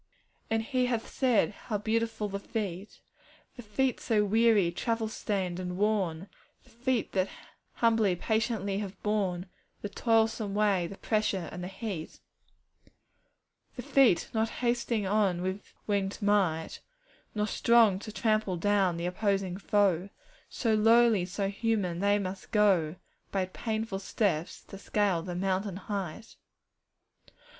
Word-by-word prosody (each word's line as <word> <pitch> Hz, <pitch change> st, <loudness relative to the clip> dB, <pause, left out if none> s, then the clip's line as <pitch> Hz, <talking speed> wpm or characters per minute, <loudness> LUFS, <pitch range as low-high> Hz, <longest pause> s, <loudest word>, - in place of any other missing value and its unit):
'And 225 Hz, 0 st, +1 dB
He 255 Hz, +1 st, 0 dB
hath 235 Hz, -2 st, -1 dB
said, 250 Hz, -6 st, +2 dB
"How 210 Hz, +1 st, -4 dB
beautiful 220 Hz, 0 st, -1 dB
the 200 Hz, 0 st, -4 dB
feet!" 200 Hz, -2 st, -5 dB, 0.5 s
The 245 Hz, -, -8 dB
"feet" 245 Hz, +4 st, 0 dB
so 210 Hz, -2 st, +1 dB
weary, 215 Hz, -4 st, +4 dB
travel 225 Hz, +5 st, -1 dB
stained, 190 Hz, -5 st, -2 dB
and 180 Hz, -1 st, -4 dB
worn 195 Hz, -4 st, 0 dB, 0.4 s
The -, -, -22 dB
"feet" 245 Hz, 0 st, -1 dB
that 190 Hz, 0 st, 0 dB, 0.4 s
humbly, 225 Hz, -5 st, +2 dB
patiently 215 Hz, -1 st, -1 dB
have 195 Hz, -2 st, -6 dB
borne 195 Hz, -4 st, 0 dB, 0.4 s
The 205 Hz, -, -3 dB
toilsome 225 Hz, -2 st, +1 dB
way, 200 Hz, -4 st, +2 dB
the 195 Hz, -, -9 dB
pressure, 210 Hz, -5 st, 0 dB
and 180 Hz, +1 st, -6 dB
the -, -, -4 dB
heat. 190 Hz, -4 st, -6 dB, 1.6 s
'The -, -, -6 dB
"feet," 255 Hz, -11 st, +4 dB
not 220 Hz, 0 st, +1 dB
hasting 235 Hz, -3 st, -1 dB
on 190 Hz, -3 st, +1 dB
with 190 Hz, +2 st, -4 dB, 0.2 s
wingèd 200 Hz, -2 st, -1 dB
might, 195 Hz, -6 st, +1 dB, 0.6 s
Nor 210 Hz, 0 st, +1 dB
strong 220 Hz, -2 st, +4 dB
to 215 Hz, -, -8 dB
trample 215 Hz, -4 st, 0 dB
down 195 Hz, -1 st, +2 dB
the 170 Hz, -, -3 dB
opposing 195 Hz, 0 st, 0 dB
foe; 195 Hz, -3 st, +1 dB, 0.4 s
So 225 Hz, -3 st, 0 dB
lowly, 225 Hz, 0 st, +5 dB
and 180 Hz, +1 st, -3 dB
so 200 Hz, +1 st, -1 dB
human, 200 Hz, -4 st, -1 dB
they 205 Hz, +1 st, +3 dB
must 190 Hz, -1 st, -5 dB
go 190 Hz, -7 st, +3 dB, 0.4 s
By 190 Hz, -2 st, 0 dB
painful 220 Hz, +1 st, -3 dB
steps 190 Hz, -4 st, -1 dB
to 195 Hz, -, -11 dB
scale 200 Hz, -4 st, +1 dB
the 180 Hz, 0 st, -5 dB
mountain 190 Hz, +1 st, -1 dB
height. 200 Hz, +1 st, -5 dB
205 Hz, 135 wpm, -29 LUFS, 185-220 Hz, 1.6 s, lowly